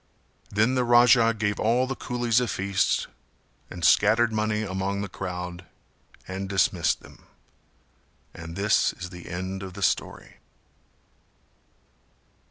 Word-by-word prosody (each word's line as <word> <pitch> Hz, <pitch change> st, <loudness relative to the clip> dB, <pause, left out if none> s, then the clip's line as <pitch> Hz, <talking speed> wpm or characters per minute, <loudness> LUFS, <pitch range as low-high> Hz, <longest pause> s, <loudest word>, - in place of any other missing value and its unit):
Then 110 Hz, +5 st, +2 dB
the 130 Hz, -1 st, +1 dB
Raja 120 Hz, -1 st, +5 dB
gave 105 Hz, -2 st, -2 dB
all 120 Hz, +4 st, +2 dB
the 135 Hz, +1 st, -4 dB
coolies 120 Hz, -2 st, 0 dB
a 125 Hz, -, -1 dB
feast 100 Hz, -2 st, 0 dB, 0.6 s
and 85 Hz, -2 st, -4 dB
scattered 110 Hz, +2 st, +4 dB
money 110 Hz, 0 st, 0 dB
among 100 Hz, 0 st, -3 dB
the 100 Hz, -, -3 dB
crowd 90 Hz, -1 st, -6 dB, 0.6 s
and 95 Hz, +1 st, -5 dB
dismissed 95 Hz, -3 st, +1 dB
them. -, -, -17 dB, 1.1 s
And 85 Hz, 0 st, -9 dB
this 100 Hz, +2 st, +2 dB
is 90 Hz, -1 st, -8 dB
the 90 Hz, -1 st, -10 dB
end 95 Hz, +2 st, -5 dB
of 95 Hz, -2 st, -8 dB
the 100 Hz, -, -5 dB
story. -, -, -2 dB
100 Hz, 125 wpm, -25 LUFS, 95-115 Hz, 1.1 s, Raja